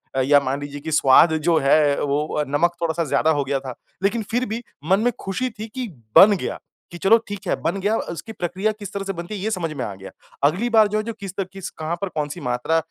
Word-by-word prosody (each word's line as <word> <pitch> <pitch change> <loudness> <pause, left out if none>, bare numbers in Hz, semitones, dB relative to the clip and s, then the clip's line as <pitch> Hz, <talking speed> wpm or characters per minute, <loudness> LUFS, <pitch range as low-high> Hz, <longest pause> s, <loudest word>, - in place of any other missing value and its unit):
अ, 135 - +2
या 145 +2 +5
मान 140 +1 -3
लीजिए 145 0 -6
कि 160 - -5
स्वाद 155 +2 +6 0.2
जो 165 - +4
है 145 +1 +3
वो 150 +1 0
नमक 145 +5 +2
थोड़ा-सा 165 0 0
ज़्यादा 155 +2 +2
हो - - +1
गया 135 0 -1
था। 130 -2 -7 0.3
लेकिन 220 +3 +1
फ़िर 245 +2 +1
भी 225 +3 -4 0.3
मन 195 - +5
में 245 +2 +2
खुशी 250 +7 -2
थी 220 0 -8
कि 255 -2 -3 0.3
बन 205 +2 +9
गया, - - -4 0.3
कि 175 - -7
चलो 210 +6 +5
ठीक 205 -2 -7
है - - +2
बन 185 +4 -1
गया 205 +3 +1
उसकी 170 +5 -6
प्रक्रिया 185 +4 -1
किस 205 -2 -8
तरह 200 0 -3
से 195 - -2
बनती 175 +5 -6
है 195 - -6
ये 220 - -1
समझ 170 -5 -2
में 135 -4 -4
आ 100 - -5
गया। 95 0 -11 0.3
अगली 180 +12 +2
बार 220 -2 +5
जो 210 - -1
है 215 - -1
जो 230 0 -4
किस 195 -2 -6
त 190 - -1
किस 195 -2 -6
कहाँ 160 +2 -4
पर 200 - -2
कौन-सी 150 +1 -4
मात्रा 125 +7 +1
175 Hz, 255 wpm, -22 LUFS, 145-205 Hz, 0.3 s, बन